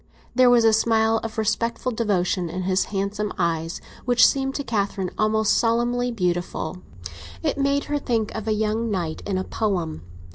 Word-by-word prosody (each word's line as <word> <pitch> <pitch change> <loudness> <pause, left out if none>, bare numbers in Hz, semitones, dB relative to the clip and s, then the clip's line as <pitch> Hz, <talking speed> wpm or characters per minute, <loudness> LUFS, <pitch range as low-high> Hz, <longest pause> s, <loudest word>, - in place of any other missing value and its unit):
There 255 0 +5
was 240 -1 +5
a 225 - +5
smile 225 0 +3
of 225 -1 -6
respectful 230 +3 0
devotion 190 -6 0
in 185 +3 -4
his 185 +1 +1
handsome 205 +1 -2
eyes 165 -1 -1 0.2
which 245 -1 +5
seemed 270 -1 +1
to 285 - -2
Catherine 200 -5 -2
almost 215 0 +2
solemnly 240 +1 +1
beautiful; 175 -5 -2 0.7
it - - +1
made 280 +1 +2
her 290 0 -2
think 230 -6 -1
of 220 -1 -5
a - - +1
young 220 +2 0
knight 175 -6 -2
in 195 -2 0
a 185 - -1
poem. 180 - -2
220 Hz, 170 wpm, -23 LUFS, 185-235 Hz, 0.7 s, There